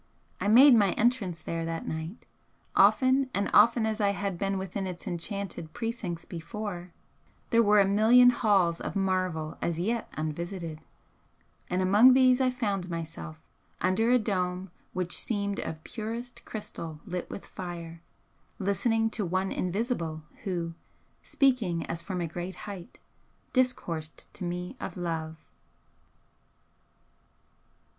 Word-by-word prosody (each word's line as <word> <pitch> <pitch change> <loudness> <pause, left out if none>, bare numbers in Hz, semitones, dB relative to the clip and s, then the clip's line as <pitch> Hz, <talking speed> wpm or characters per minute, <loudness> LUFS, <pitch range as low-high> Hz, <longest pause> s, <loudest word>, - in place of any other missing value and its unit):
I - - -1
made 255 +6 +8
my 205 -5 +4
entrance 210 -8 0
there 165 0 -3
that 165 0 -4
night; 160 +7 -5 0.5
often 260 0 +5
and 200 0 0
often 230 +2 +6
as 220 0 -1
I 200 -1 +3
had 200 -2 -2
been 195 0 0
within 190 +1 -3
its 180 -1 -7
enchanted 175 -2 -4
precincts 225 -8 -4
before, 180 0 -6 0.6
there 230 -1 +6
were 210 -1 +5
a 200 - +6
million 225 +5 +6
halls 195 -8 +2
of - - -4
marvel 185 -5 -1
as 170 -2 -1
yet 220 +6 -1
unvisited, 165 +1 -4 0.9
and 180 +1 +1
among 215 +7 +7
these 255 0 +5
I 260 - +4
found 205 -7 -2
myself, 165 -1 -6 0.4
under 185 +6 +2
a 250 - +6
dome 185 -4 -2 0.2
which 180 -2 0
seemed 200 -3 0
of 160 0 -5
purest 230 +2 -6
crystal 165 -7 -7
lit 180 -3 -4
with - - -7
fire, 170 -2 -7 0.6
listening 225 +3 +1
to 215 - -2
One 185 +2 -1
invisible, 180 -5 -2 0.2
who, 170 -3 -2 0.5
speaking 230 - +1
as 165 0 -4
from 180 0 -4
a 170 - -1
great 175 +3 -5
height, 200 +1 -8 0.6
discoursed 170 - -1
to 195 - -7
me 180 +5 -4
of - - -6
Love." 160 -2 -3
190 Hz, 135 wpm, -28 LUFS, 170-225 Hz, 0.9 s, made